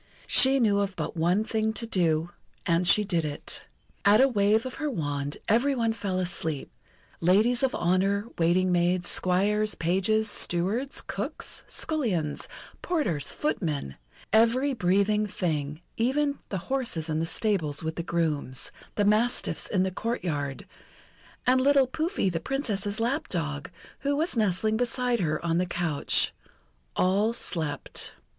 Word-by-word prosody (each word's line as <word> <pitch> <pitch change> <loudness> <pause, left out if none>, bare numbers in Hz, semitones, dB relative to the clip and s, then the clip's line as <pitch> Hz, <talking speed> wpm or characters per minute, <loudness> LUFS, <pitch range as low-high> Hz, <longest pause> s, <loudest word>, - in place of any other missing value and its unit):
She 270 0 +5
knew 205 -4 +3
of 200 -1 -1
but - - -4
one 175 +6 +2
thing 220 -1 -1
to 230 - -1
do, 170 -5 +1 0.3
and 170 +1 +2
she 210 - +5
did 175 -5 0
it. 145 -1 -3 0.4
At 205 +2 +6
a 265 - +6
wave 215 -1 +2
of 255 - -5
her 300 - 0
wand 145 - -3
every 255 +6 +3
one 230 -2 +1
fell 200 -4 -3
asleep 165 -5 -2 0.5
ladies 215 +8 +3
of 265 -2 +1
honour, 195 +4 +1
waiting 180 +2 +3
maids, 175 0 +1
squires, 210 +4 +1
pages, 195 +6 +1
stewards, 205 +7 0
cooks, - - -4
scullions, 195 - -1 0.3
porters, 215 - 0
footmen, 155 - -2 0.4
every 240 +5 +4
breathing 200 +1 +2
thing, 155 -5 -3 0.2
even 280 +5 +1
the 195 - -2 0.2
horses 230 -12 -2
in 155 -1 -1
the 165 - 0
stables 165 -8 0
with 160 0 -3
the - - -2
grooms, 155 -6 -1 0.2
the 205 - +1
mastiffs 215 +4 +1
in 185 -3 +1
the 190 - -1
courtyard, 160 - -3 0.8
and 255 +1 +4
little 275 0 +5
Pouffi, 315 - -1
the 175 -3 -1
Princess's 215 - -2
lap 270 +8 -1
dog, 150 -5 -3 0.3
who 285 0 0
was 320 -1 0
nestling 215 0 +1
beside 245 0 0
her 155 -1 -1
on 165 0 +1
the 180 - 0
couch 170 -4 +1 0.6
all 200 +5 +2
slept. 160 -9 -2
200 Hz, 145 wpm, -27 LUFS, 170-235 Hz, 0.8 s, At